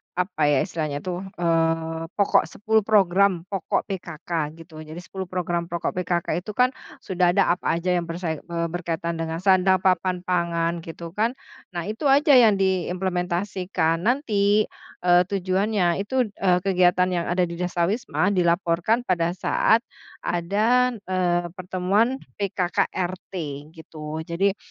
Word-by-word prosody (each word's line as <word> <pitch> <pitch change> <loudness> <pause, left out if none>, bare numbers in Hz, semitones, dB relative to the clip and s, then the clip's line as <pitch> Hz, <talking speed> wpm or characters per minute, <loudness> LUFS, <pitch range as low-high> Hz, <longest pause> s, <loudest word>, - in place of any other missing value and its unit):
apa 175 -5 0
ya 145 -2 +3
istilahnya 150 -3 -3
tuh, 180 -1 -3 0.2
eee, 165 -1 0
pokok 200 -1 +3
10 220 +2 +1
program, 195 -3 +3
pokok 195 -4 -1
PKK, 170 -4 -4
gitu. 165 -1 -12
Jadi 155 +1 -9
10 190 0 -6
program 175 -1 -2
pokok 170 0 -2
PKK 175 -1 -1
itu 205 +4 -8
kan 250 +1 +3 0.3
sudah 180 -2 +2
ada 195 - +4
apa 175 -1 0
aja 180 +2 -1
yang 175 -1 0
bersai 165 -2 -3
eee, 170 -1 -3
berkaitan 170 -1 -3
dengan 165 +2 -3
sandang, 190 -1 +5
papan, 185 -1 +1
pangan 170 -2 0
gitu 165 0 -8
kan. 225 +6 0 0.4
Nah, 170 - -2
itu 220 +8 -2
aja 285 +3 +5
yang 230 -6 +7
diimplementasikan, 180 -1 -1
nanti, 215 -6 +2 0.4
eee 175 0 +6
tujuannya 195 -1 0
itu, 255 +6 +1
eee, 180 -3 +2
kegiatan 180 -1 +3
yang 175 -1 -1
ada 180 +1 +1
di 170 0 -4
dasawisma 180 +3 0
dilaporkan 175 +5 +1
pada 175 -3 0
saat 225 +5 +2 0.4
ada, 220 +8 +2
eee, 180 -4 -1
pertemuan 195 +8 0 0.2
PKK, 185 -3 0
RT, 185 +1 -5 0.4
gitu. 155 -1 -7
Jadi, 190 +4 0
180 Hz, 140 wpm, -24 LUFS, 170-195 Hz, 0.4 s, yang